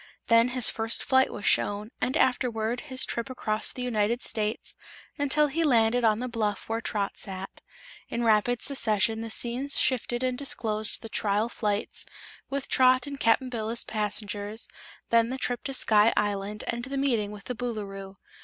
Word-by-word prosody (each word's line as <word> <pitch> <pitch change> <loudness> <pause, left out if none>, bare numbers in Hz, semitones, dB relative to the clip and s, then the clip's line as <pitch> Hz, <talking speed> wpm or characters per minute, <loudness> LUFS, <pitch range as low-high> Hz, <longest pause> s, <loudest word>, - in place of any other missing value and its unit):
Then 230 +1 +6
his 250 -2 +3
first 225 0 -1
flight 260 0 +3
was 205 - -7
shown, 205 +2 +1
and 260 - +1
afterward 240 -2 +1
his 260 -2 +2
trip 235 +2 -3
across 215 -4 +1
the 250 - -5
United 235 0 0
States 215 0 -2 0.5
until 285 +1 +3
he 305 +3 -1
landed 240 -4 +3
on 215 -2 +4
the 250 +2 -3
bluff 215 -4 -2
where 225 +1 -2
Trot 205 -3 -2
sat. 190 0 -7 0.5
In 235 - -2
rapid 230 +2 +2
succession 225 -4 +1
the 225 - -5
scenes 245 +5 +1
shifted 245 -1 +1
and 255 -1 0
disclosed 220 -6 -2
the - - -6
trial 210 +1 0
flights, 210 -3 -1 0.5
with 275 0 -3
Trot 255 -1 +4
and 280 -1 -7
Cap'n 230 +3 +2
Bill 225 -3 -3
as 235 +1 0
passengers, 210 0 -2 0.4
then 230 0 +4
the 260 - -3
trip 245 -2 -2
to 275 - -2
Sky 215 -2 +5
Island 205 0 -1
and 240 0 -3
the 275 +1 -4
meeting 240 -7 +1
with 205 -1 -10
the 250 - -4
Boolooroo. 200 -5 -5
230 Hz, 175 wpm, -27 LUFS, 210-255 Hz, 0.5 s, Then